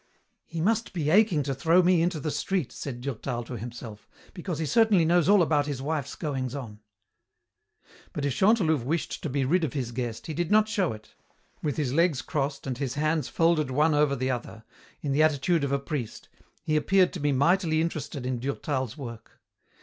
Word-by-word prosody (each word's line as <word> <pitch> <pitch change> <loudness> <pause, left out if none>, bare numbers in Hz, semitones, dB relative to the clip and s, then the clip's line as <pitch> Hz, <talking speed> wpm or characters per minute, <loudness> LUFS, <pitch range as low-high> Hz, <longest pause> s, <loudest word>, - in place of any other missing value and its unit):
"He 165 -1 -4
must 225 +4 0
be 155 -4 -1
aching 190 -6 +4
to 135 0 -2
throw 165 +7 +3
me 175 -1 +4
into 170 -1 0
the 150 +1 -3
street," 185 -5 -1
said 125 -4 -6
Durtal 125 -2 -4
to 120 +2 -7
himself, 115 -2 -8 0.2
"because 175 -3 -4
he 160 - -2
certainly 200 - +4
knows 175 +1 +3
all 200 -3 +6
about 150 -2 +1
his 140 -3 -3
wife's 140 -1 -3
goings 135 -5 -3
on." 115 -7 -7 1.3
But 145 - -3
if 140 - 0
Chantelouve 185 - +3
wished 155 +4 -2
to 155 - -3
be 135 0 0
rid 170 +6 +2
of 150 - -2
his 130 -5 -3
guest 120 -2 -4
he 160 - -4
did 175 +1 -2
not 215 0 +4
show 200 -5 0
it. 110 0 -11 0.5
With 150 -3 -2
his 140 -5 -1
legs 165 -4 +2
crossed 140 -1 -2
and 130 -2 -4
his 135 -2 -2
hands 155 -1 0
folded 165 -4 +2
one 150 +4 +2
over 145 -1 +3
the 130 0 -1
other, 120 -2 -6 0.4
in 145 - -2
the 140 +3 +2
attitude 155 +1 +2
of 140 - -1
a 140 - +2
priest, 140 -5 -5 0.3
he 155 - 0
appeared 185 +4 +3
to 180 - -5
be 145 -1 +1
mightily 160 +4 +2
interested 155 -5 -3
in 130 -1 -2
Durtal's 130 -1 -3
work. 115 -5 -9
150 Hz, 200 wpm, -27 LUFS, 130-170 Hz, 1.3 s, all